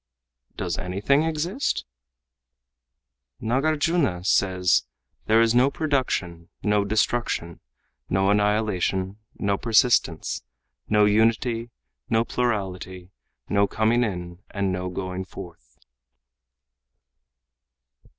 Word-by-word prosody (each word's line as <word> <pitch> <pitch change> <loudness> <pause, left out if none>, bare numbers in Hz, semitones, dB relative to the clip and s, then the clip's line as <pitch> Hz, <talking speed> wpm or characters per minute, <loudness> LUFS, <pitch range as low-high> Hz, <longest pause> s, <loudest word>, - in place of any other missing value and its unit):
"Does - - -3
anything 100 +11 +1
exist?" 165 - -1 1.5
"Nâgârjuna 145 - +1
says: 90 -7 +2 0.4
'There 110 +1 +5
is 115 0 +3
no 125 +3 +5
production, 130 - -2
no 105 -1 +2
destruction, 105 -5 -1 0.5
no 95 +1 +2
annihilation, 105 -2 0 0.2
no 100 -1 0
persistence, 120 +1 +2 0.5
no 105 -1 +5
unity, 115 +2 +2 0.4
no 115 +1 +2
plurality, 95 -7 -3 0.4
no 100 0 +2
coming 110 +4 +2
in 90 -5 -4
and 100 -2 -1
no 90 0 -3
going 95 0 -4
forth. 85 -10 -12
105 Hz, 85 wpm, -24 LUFS, 95-120 Hz, 1.5 s, There